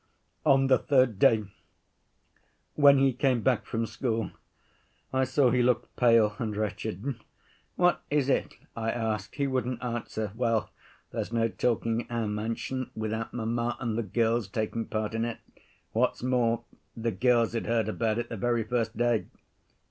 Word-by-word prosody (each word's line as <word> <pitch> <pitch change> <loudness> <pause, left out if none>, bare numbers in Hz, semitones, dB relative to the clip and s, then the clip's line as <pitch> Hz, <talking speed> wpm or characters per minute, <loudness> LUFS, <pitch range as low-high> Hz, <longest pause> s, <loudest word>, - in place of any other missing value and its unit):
" - - -43
"On 135 0 +3
the 130 -1 +4
third 130 -8 +2
day 110 -1 +5 1.3
when 140 -1 +6
he 135 -1 +3
came 130 -3 +1
back 125 0 +1
from 115 0 -1
school, 115 0 -2 0.8
I 130 0 +2
saw 130 -1 +3
he 125 0 +3
looked 120 0 +1
pale 115 -3 +4
and 110 -3 -3
wretched. 105 +3 -3 0.6
'What 180 0 +3
is 145 -2 +1
it?' 140 - 0 0.2
I 115 0 -2
asked. 110 -3 -2
He 140 - 0
wouldn't 130 -2 -2
answer. 115 -3 -3
Well, 115 -1 0 0.4
there's - - -3
no 115 -1 +1
talking 115 0 0
in - - -12
our 115 -2 -1
mansion 115 +5 -3
without 110 +1 -3
mamma 120 +1 -2
and 115 -3 -2
the 115 - 0
girls 115 +1 0
taking 110 +2 -2
part 110 0 -2
in 115 0 -1
it. 115 -1 -3 0.5
What's - - 0
more, 120 -2 +1 0.3
the 115 0 -1
girls 120 -1 +2
had 115 - -2
heard 115 -2 +1
about 110 0 0
it 120 - -3
the 115 - -5
very 120 +2 +1
first 115 -1 -2
day. 120 -2 +1
115 Hz, 165 wpm, -28 LUFS, 110-125 Hz, 1.3 s, when